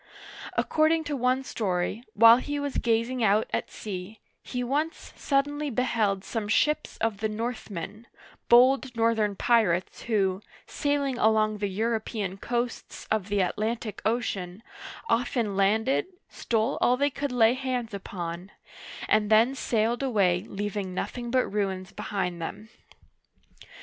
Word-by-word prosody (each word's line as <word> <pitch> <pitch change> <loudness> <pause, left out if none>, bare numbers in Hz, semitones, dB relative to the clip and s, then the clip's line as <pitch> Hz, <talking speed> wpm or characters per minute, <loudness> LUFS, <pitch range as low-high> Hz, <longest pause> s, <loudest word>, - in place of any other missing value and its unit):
According 320 +1 +2
to 295 -1 -3
one 255 +1 +1
story, 200 -1 -2
while 230 +2 +8
he 290 +3 -3
was 285 -1 -2
gazing 235 +2 0
out 215 +1 +3
at - - -1
sea, 200 +1 -7 0.2
he 250 -1 -4
once 295 +6 -2
suddenly 290 +1 0
beheld 220 -6 0
some 220 -2 -3
ships 300 +8 +1
of 220 -3 -1
the 220 +1 -1
Northmen 215 -2 -5 0.2
— - - -27
bold 255 +1 +5
northern 225 -3 +1
pirates 195 -7 +1
who, 195 -4 0 0.2
sailing 285 -3 -1
along 215 -1 +2
the 205 - 0
European 215 -1 -2
coasts 240 +3 -4
of 215 -2 0
the 205 -1 +2
Atlantic 215 +3 -2
Ocean, 205 -4 -2 0.4
often 230 - 0
landed, 220 - +2 0.2
stole 225 +3 -1
all 250 - +4
they 285 +2 +1
could 280 0 -3
lay 235 -2 +4
hands 250 -4 -3
upon, 180 -2 -6 0.6
and 210 -1 +2
then 225 +4 +5
sailed 235 -2 0
away 195 -9 +2
leaving 200 -2 -4
nothing 240 +4 -4
but 255 +1 +2
ruins 195 -2 -2
behind 180 -4 -3
them. 210 +6 -6
225 Hz, 135 wpm, -27 LUFS, 200-250 Hz, 0.6 s, while